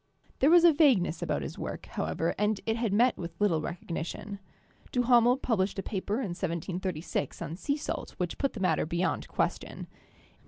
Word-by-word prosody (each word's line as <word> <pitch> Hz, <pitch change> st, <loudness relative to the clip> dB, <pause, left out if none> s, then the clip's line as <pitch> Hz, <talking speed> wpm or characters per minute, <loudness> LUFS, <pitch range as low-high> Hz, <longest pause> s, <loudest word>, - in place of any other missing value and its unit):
There 275 Hz, -, +5 dB
was 345 Hz, +1 st, +7 dB
a 340 Hz, -2 st, +8 dB
vagueness 245 Hz, -, +3 dB
about 70 Hz, -, -1 dB
his 70 Hz, -, -7 dB
work, -, -, -5 dB
however, 80 Hz, -, -2 dB
and 210 Hz, 0 st, +1 dB
it 225 Hz, -, +1 dB
had 230 Hz, -3 st, -1 dB
met 235 Hz, +5 st, +3 dB
with 170 Hz, -1 st, -7 dB
little 185 Hz, -7 st, +2 dB
recognition. 175 Hz, +4 st, -5 dB, 0.5 s
Duhamel 245 Hz, 0 st, +4 dB
published 205 Hz, -8 st, 0 dB
a 195 Hz, -, -2 dB
paper 200 Hz, +1 st, -2 dB
in 235 Hz, -4 st, -2 dB
1736 175 Hz, -3 st, -3 dB
on 160 Hz, -, -5 dB
sea 285 Hz, -, -1 dB
salt 300 Hz, -, -5 dB
which 175 Hz, -2 st, -3 dB
put 275 Hz, -, 0 dB
the 225 Hz, -, -7 dB
matter 185 Hz, -4 st, +1 dB
beyond 175 Hz, +3 st, -1 dB
question. -, -, -2 dB
195 Hz, 170 wpm, -29 LUFS, 170-240 Hz, 0.5 s, a